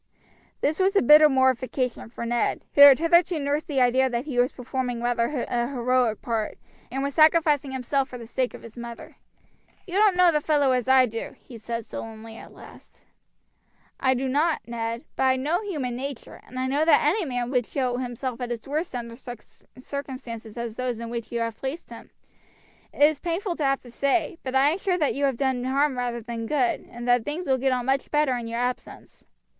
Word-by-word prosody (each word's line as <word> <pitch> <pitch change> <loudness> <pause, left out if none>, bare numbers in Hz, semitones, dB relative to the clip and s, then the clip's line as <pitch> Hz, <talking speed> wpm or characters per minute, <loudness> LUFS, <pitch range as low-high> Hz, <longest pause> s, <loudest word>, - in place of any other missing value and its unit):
This 305 +4 0
was 385 +2 +2
a - - +5
bitter 300 +4 +8
mortification 260 -2 0
for 235 0 -6
Ned, 240 0 -1
who 285 - +4
had 280 -2 +10
hitherto 340 +1 +3
nursed 290 +1 -1
the 275 -4 0
idea 260 +2 +3
that 240 +1 -3
he 265 -5 -2
was 245 +1 +3
performing 250 -1 -4
rather 240 +2 0
a 240 0 -1
heroic 250 -3 0
part, 225 -3 -2 0.3
and 270 +2 -2
was 280 0 -2
sacrificing 310 -3 +4
himself 265 +1 -1
for 250 - -7
the 235 - -9
sake 250 +2 -2
of - - -13
his 230 -2 -12
mother. 235 -1 -9 0.7
"You 365 - -10
don't 420 -3 +5
know 360 -1 +5
the 300 -2 +1
fellow 290 -3 +2
as 250 -2 0
I 260 -1 +6
do," 225 -1 -6
he 245 - -14
said 230 0 -5
sullenly 225 0 -8
at - - -12
last. - - -15 1.0
"I 260 0 +2
do 265 +2 -2
not, 300 +5 +1
Ned; 230 0 -4
but - - -4
I 260 0 +4
know 300 +8 -1
human 295 - -3
nature, 270 0 -7
and 255 - -10
I 255 - -1
know 280 +4 +1
that 320 - +4
any 370 +7 +2
man 245 -4 -3
would 250 -4 +1
show 250 -3 -1
himself 250 0 -4
at 245 - -3
his 235 0 -5
worst 305 +1 -3
under 235 -1 -5
such 240 -2 -10 0.3
circumstances 255 -5 -7
as 235 -2 -5
those 250 -2 -2
in 230 0 -6
which 235 -1 -5
you 235 -1 -2
hare 230 0 -1
placed 270 +9 -6
him. - - -11 0.8
It - - +1
is 300 -1 +4
painful 350 +1 -2
to 300 - -1
have 275 0 +1
to 245 - -14
say, 305 +6 0
but 260 0 -5
I 270 +2 +5
am 345 - -3
sure 375 -2 0
that 300 -5 +1
you 280 +1 0
have 270 -3 0
done 260 -2 0
harm 275 +1 +1
rather 245 -1 -3
than 230 0 -5
good, 265 -4 0
and 240 +1 -8
that 245 -1 +3
things 310 +7 -4
will 265 -3 +1
get 265 +1 +1
on 250 -1 -1
much 270 +1 0
better 295 -4 +2
in 240 -1 -5
your 230 +1 -3
absence." 250 0 -5
260 Hz, 215 wpm, -25 LUFS, 240-290 Hz, 1.0 s, had